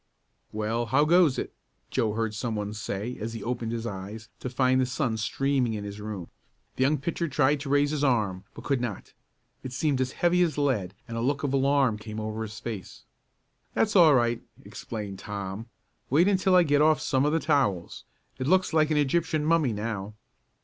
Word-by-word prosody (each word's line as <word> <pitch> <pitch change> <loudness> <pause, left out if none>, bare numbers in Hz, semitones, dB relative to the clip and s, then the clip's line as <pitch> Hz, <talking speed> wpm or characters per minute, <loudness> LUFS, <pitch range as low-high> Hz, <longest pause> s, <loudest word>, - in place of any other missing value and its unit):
"Well, 110 +2 -1
how 135 +6 +3
goes 170 -4 +4
it?" - - -4 0.4
Joe 110 -2 +1
heard 110 -1 -1
some 115 +1 -3
one 105 0 -3
say, 105 +3 -4
as 115 +2 -4
he 115 - -6
opened 120 -1 -3
his 115 0 -3
eyes 105 +2 -7
to 130 - -4
find 130 +1 +2
the 130 - +1
sun 130 -2 -1
streaming 130 +1 0
in 105 - -4
his 100 0 -7
room. 105 -5 -6 0.5
The - - -4
young 145 +3 +3
pitcher 170 +4 -2
tried 145 0 +2
to 140 0 -6
raise 145 +1 +3
his 150 -1 -1
arm 105 -9 +1
but - - -9
could 140 -4 0
not. 120 -6 -5 0.5
It 130 - -7
seemed 140 -1 0
as 130 0 -1
heavy 175 +1 +2
as 170 -4 +1
lead 110 -11 0
and 115 0 -5
a - - -1
look 140 +4 0
of 140 -2 -1
alarm 135 -4 +2
came 110 0 -7
over 110 0 -4
his 110 -1 -6
face. 110 -6 -7 0.7
"That's 215 -1 +1
all 165 -6 +7
right," 120 -1 +1 0.2
explained 105 -4 -6
Tom. 100 +2 -6 0.4
"Wait 160 +8 +4
until 190 -1 +3
I 180 - +7
get 145 -2 +3
off 155 0 +4
some 135 -1 +1
of 150 - +2
the 165 - +2
towels. 105 - 0 0.4
It 130 - -2
looks 185 +1 +3
like 155 -1 +3
an 155 - +1
Egyptian 155 +1 +1
mummy 160 -5 +3
now." 105 -1 -4
125 Hz, 200 wpm, -27 LUFS, 110-145 Hz, 0.7 s, all